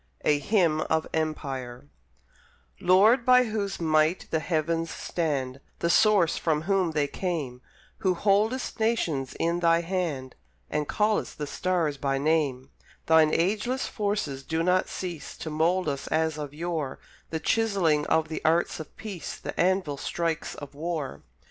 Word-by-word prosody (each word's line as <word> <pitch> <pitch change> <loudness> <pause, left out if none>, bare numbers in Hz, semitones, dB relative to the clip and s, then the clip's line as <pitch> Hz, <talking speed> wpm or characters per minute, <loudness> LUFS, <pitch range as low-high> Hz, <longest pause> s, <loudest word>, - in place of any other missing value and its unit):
A 150 -1 +4
HYMN 165 -3 +2
OF 160 0 +1
EMPIRE 135 -5 -3 0.9
Lord, 215 +7 +5
by 250 +1 +6
Whose 210 -4 -3
might 155 +1 +2
the 160 - +2
Heavens 165 +1 -1
stand, 135 -6 -2 0.2
The 170 - +1
Source 205 -5 +4
from 155 -2 0
Whom 190 -2 +1
they 150 -2 +2
came, 145 -8 -3 0.4
Who 190 -4 +1
holdest 215 +8 +1
nations 170 - 0
in 170 +1 +1
Thy 170 -1 +3
hand, 165 -8 -3 0.4
And 150 -1 -1
call'st 210 0 0
the 150 - -3
stars 165 -2 -1
by 135 0 0
name, 140 -3 0 0.3
Thine 160 -1 +5
ageless 215 +10 0
forces 200 - -2
do 160 +4 -1
not 180 +1 +2
cease 175 -4 -6
To 160 - -6
mould 170 +4 +1
us 140 -2 -3
as 160 -1 0
of 145 -2 -5
yore 155 -3 -3 0.3
The 160 - -2
chiselling 185 -9 +1
of 160 -1 +2
the 155 - -5
arts 165 +2 +2
of 155 - -10
peace, 195 -7 -6
The - - -6
anvil 180 -5 +1
strikes 165 +2 -2
of 145 -1 -9
war. 155 -2 -4
165 Hz, 150 wpm, -27 LUFS, 150-185 Hz, 0.9 s, by